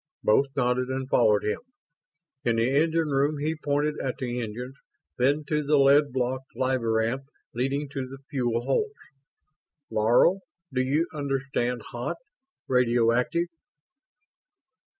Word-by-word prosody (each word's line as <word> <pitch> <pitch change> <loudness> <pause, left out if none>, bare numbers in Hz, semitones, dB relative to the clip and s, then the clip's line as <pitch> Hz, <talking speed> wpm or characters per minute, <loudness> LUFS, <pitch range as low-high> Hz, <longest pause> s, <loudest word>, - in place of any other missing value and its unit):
Both 135 +6 +4
nodded 125 -1 +1
and 130 0 -3
followed 105 -6 +3
him. 105 - -1 0.8
In 115 -1 +2
the 115 +1 +2
engine 160 +2 +2
room 145 +2 +1
he 155 +3 -1
pointed 150 0 -1
at 130 -1 -3
the 125 -2 -3
engines, 120 +4 -6 0.5
then 140 +5 +2
to 150 -1 +1
the 150 0 +2
lead 140 +1 +5
blocked 130 +1 -3
labyrinth 125 0 0 0.3
leading 135 +4 -1
to 135 -2 -4
the 135 +1 -9
fuel 120 -4 -1
holds. 425 - 0 1.0
"Laro, 120 - +4 0.3
do 130 - +2
you 145 +6 +1
understand 135 -4 -2
'hot'? 120 +8 -4 0.5
Radioactive?" 125 +5 +2
130 Hz, 125 wpm, -26 LUFS, 120-145 Hz, 1.0 s, lead